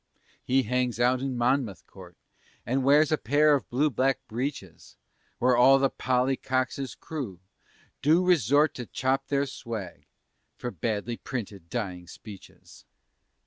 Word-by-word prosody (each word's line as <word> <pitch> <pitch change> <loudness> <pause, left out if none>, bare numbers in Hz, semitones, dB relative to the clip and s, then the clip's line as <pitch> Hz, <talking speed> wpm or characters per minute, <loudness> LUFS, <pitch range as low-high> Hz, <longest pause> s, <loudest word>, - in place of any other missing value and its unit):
He 130 +1 +2
hangs 125 0 -1
out 125 +1 +3
in 135 -2 -3
Monmouth 120 -5 0
Court, 90 -3 -14 0.5
And 130 +2 0
wears 145 +3 +4
a 155 - +2
pair 150 +4 +3
of 140 - -1
blue 145 +5 +1
black 130 +2 +1
breeches, 115 - -6 0.4
Where 125 0 +3
all 130 +3 +6
the 135 0 +1
"Polly 130 +1 0
Cox's 130 0 -2
crew" 130 - -6 0.6
do 165 +5 +3
resort 150 - +3
To 120 -3 -7
chop 135 +2 -1
their 140 0 +1
swag 115 -8 -7 0.5
for 120 - -5
badly 110 +5 -3
printed 100 -9 -7
Dying 95 -7 -4
Speeches. 100 +1 -13
125 Hz, 140 wpm, -27 LUFS, 115-135 Hz, 0.6 s, all